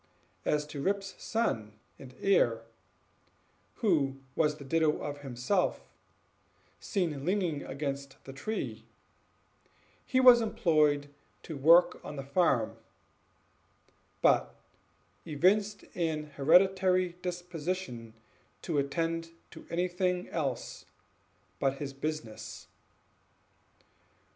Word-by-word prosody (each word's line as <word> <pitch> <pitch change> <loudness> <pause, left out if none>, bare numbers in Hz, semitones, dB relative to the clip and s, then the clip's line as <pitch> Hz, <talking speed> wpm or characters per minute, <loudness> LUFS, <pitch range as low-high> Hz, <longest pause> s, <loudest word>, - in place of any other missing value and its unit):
As 150 0 +1
to 150 -1 -7
Rip's 195 +3 -1
son 115 - -1 0.3
and 130 -2 -12
heir, 120 - +3 1.2
who 140 -9 +2 0.2
was 150 -2 +2
the 140 - -10
ditto 155 +2 +2
of 145 -1 -5
himself, 140 +8 -1 0.9
seen 165 -9 -2
leaning 180 -5 0
against 140 0 -5
the 135 - -9
tree, 215 +11 -4 1.2
he 260 - +1
was 250 -2 +8
employed 155 -9 +2 0.3
to 160 - -6
work 165 +6 +5
on 150 - -7
the 135 - -5
farm; 135 -6 +1 1.5
but - - +3 0.7
evinced 195 +7 +1
an 155 -3 -2
hereditary 185 +5 +4
disposition 175 -9 -4 0.5
to 155 -4 0
attend 165 +4 -1 0.2
to - - -12
anything 180 +1 0
else 140 -7 -3 0.7
but 135 0 +1
his 140 0 -5
business. 145 -5 -5
155 Hz, 95 wpm, -30 LUFS, 140-180 Hz, 1.5 s, was